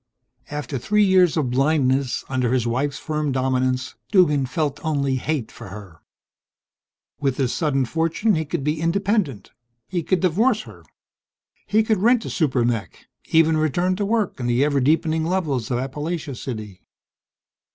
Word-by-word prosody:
After 145 -3 -4
three 210 - +2
years 185 -4 +4
of 135 -6 0
blindness, 135 -2 +1
under 130 -2 0
his 125 -3 +1
wife's 135 +4 -1
firm 150 -2 -2
dominance, 130 -1 0 0.2
Duggan 150 -9 +4
felt 145 +1 -2
only 140 -4 0
hate 140 -2 -2
for - - -11
her. 95 -4 -11 1.2
With 135 -3 0
this 130 -3 0
sudden 135 -5 +1
fortune 165 - 0
he 160 -3 0
could 160 -1 -4
be 150 +2 -1
independent. 175 - 0 0.4
He 180 -2 -2
could 180 +3 0
divorce 210 +6 +2
her. - - -13 0.9
He 220 +1 +3
could 220 -2 +1
rent 235 +1 +3
a - - -4
super 130 -8 +1
mech 115 -3 -3 0.2
even 160 0 +4
return 175 +4 +1
to 205 - -1
work 210 -5 0
in 120 - -2
the 120 +3 +2
ever 140 -2 +1
deepening 160 +3 +2
levels 160 -9 -1
of 125 - 0
Appalachia 145 +4 -4
City! 110 -7 -7
150 Hz, 155 wpm, -22 LUFS, 130-175 Hz, 1.2 s, years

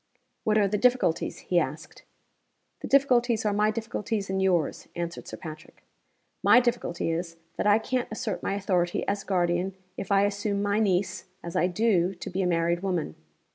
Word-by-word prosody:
"What 215 0 +3
are 205 -2 +4
the 205 +1 -1
difficulties?" 250 -8 +2
he 175 - +5
asked - - -5 0.8
"The - - -6
difficulties 245 -5 +3
are 210 - +2
my 210 +1 +3
difficulties 215 -2 -3
and 190 0 0
yours," 180 -5 +1
answered 170 0 -5
Sir - - -7
Patrick. 155 -1 -10 0.6
"My - - +7
difficulty 240 -9 -1
is, 165 0 -4 0.2
that - - 0
I 205 0 +6
can't 250 +2 -1
assert 215 -3 -3
my 195 - -1
authority, 180 -4 0
as 200 0 -1
guardian, 180 0 0 0.2
if 195 - -5
I 200 0 +5
assume 205 0 -1
my 205 +1 +1
niece 195 -3 0 0.2
(as 170 - -6
I 180 - +3
do) 190 -1 +1
to 175 - -7
be 190 +2 -1
a 185 - +1
married 170 0 +1
woman. 180 - -2
195 Hz, 175 wpm, -27 LUFS, 175-215 Hz, 0.8 s, My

